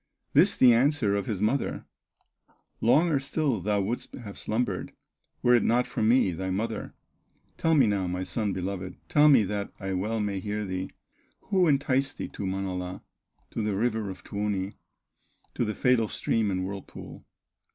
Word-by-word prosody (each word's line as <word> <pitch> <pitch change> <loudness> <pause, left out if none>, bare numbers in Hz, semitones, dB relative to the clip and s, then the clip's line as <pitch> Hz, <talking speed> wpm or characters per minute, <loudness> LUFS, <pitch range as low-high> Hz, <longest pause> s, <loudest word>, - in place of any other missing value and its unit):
This - - +5
the 125 -2 +7
answer 125 -4 +2
of 100 -1 -2
his 105 -3 -2
mother: 130 +6 0 1.0
"Longer 150 +5 +4
still 135 -3 -1
thou 105 +2 +1
wouldst 110 +6 -3
have 105 -6 -9
slumbered, 110 -4 -2 0.5
Were 125 - +5
it 120 - +5
not 120 +2 +2
for - - -4
me, 110 -2 +4
thy 95 +3 -4
mother; 110 +5 -3 0.6
Tell 165 0 +2
me 135 -4 +6
now, 100 -3 0
my 90 +1 -2
son 105 +1 -1
beloved, 95 0 -4
Tell 150 0 +5
me 130 -7 +6
that 100 +1 -3
I 95 -1 -3
well 105 +5 -1
may 100 -2 -1
hear 105 +2 -3
thee, 95 0 -4 0.6
Who 185 -3 +4
enticed 135 -1 +1
thee - - -5
to 100 - -5
Manala, 95 -1 -4 0.5
To - - -3
the 105 -2 -1
river 110 -1 0
of 95 -1 -9
Tuoni, 100 -1 -2 0.8
To - - -1
the 105 -2 -2
fatal 125 -3 +3
stream 110 0 0
and 95 -1 -1
whirlpool?" 100 0 -8
105 Hz, 165 wpm, -27 LUFS, 95-125 Hz, 1.0 s, the